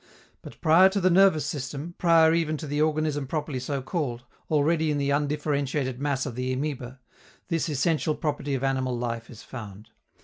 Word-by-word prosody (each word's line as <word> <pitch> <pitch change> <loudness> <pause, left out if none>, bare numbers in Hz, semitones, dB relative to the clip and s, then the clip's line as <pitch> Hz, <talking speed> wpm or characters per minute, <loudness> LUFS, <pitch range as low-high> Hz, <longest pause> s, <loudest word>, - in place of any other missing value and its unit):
But, - - -12
prior 170 +4 +6
to 200 +1 -1
the 185 -1 +3
nervous 185 -4 +5
system, 145 +3 -5
prior 165 -2 +5
even 160 -2 0
to 155 - -6
the 145 +1 -1
organism 155 -2 0
properly 150 -2 -3
so 135 +1 -3
called, 130 -4 -3 0.2
already 155 +1 +2
in 150 - 0
the 140 0 0
undifferentiated 145 -2 -1
mass 140 -2 0
of 130 - -4
the 125 +2 -2
amoeba, 130 -2 -4 0.5
this 165 -1 0
essential 155 +2 +1
property 145 -2 -2
of 130 - -3
animal 130 -2 0
life 115 -1 -4
is 115 -3 -12
found. 105 -4 -10
145 Hz, 175 wpm, -26 LUFS, 130-155 Hz, 0.5 s, prior